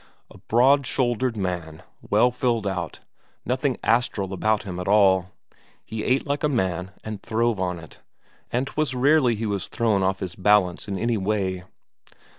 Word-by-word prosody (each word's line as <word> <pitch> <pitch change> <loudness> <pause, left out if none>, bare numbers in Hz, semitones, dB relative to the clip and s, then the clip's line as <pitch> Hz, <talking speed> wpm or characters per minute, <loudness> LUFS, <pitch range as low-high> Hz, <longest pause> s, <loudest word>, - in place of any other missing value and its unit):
A - - -14
broad 130 +3 +3
shouldered 120 -2 0
man, 90 -5 -4 0.2
well 110 +4 +3
filled 120 -3 0
out, 90 -4 -4 0.4
nothing 130 +1 0
astral 110 -4 +1
about 110 +3 +1
him 90 -3 -6
at 90 - -5
all; 95 -3 +4 0.6
he 110 -1 -5
ate 130 +2 +1
like 145 0 -2
a 150 - +3
man 95 - -1
and 110 -2 -6
throve 115 -2 0
on 90 -2 -1
it, 80 -1 -13 0.5
and 125 +3 0
'twas 145 -2 -2
rarely 130 -2 +4
he 110 +2 -3
was 100 -3 -2
thrown 110 -5 +1
off 95 0 0
his 90 -2 -5
balance 100 -1 +2
in 100 -1 -3
any 115 +3 0
way. 95 -2 -1
105 Hz, 165 wpm, -24 LUFS, 95-125 Hz, 0.6 s, all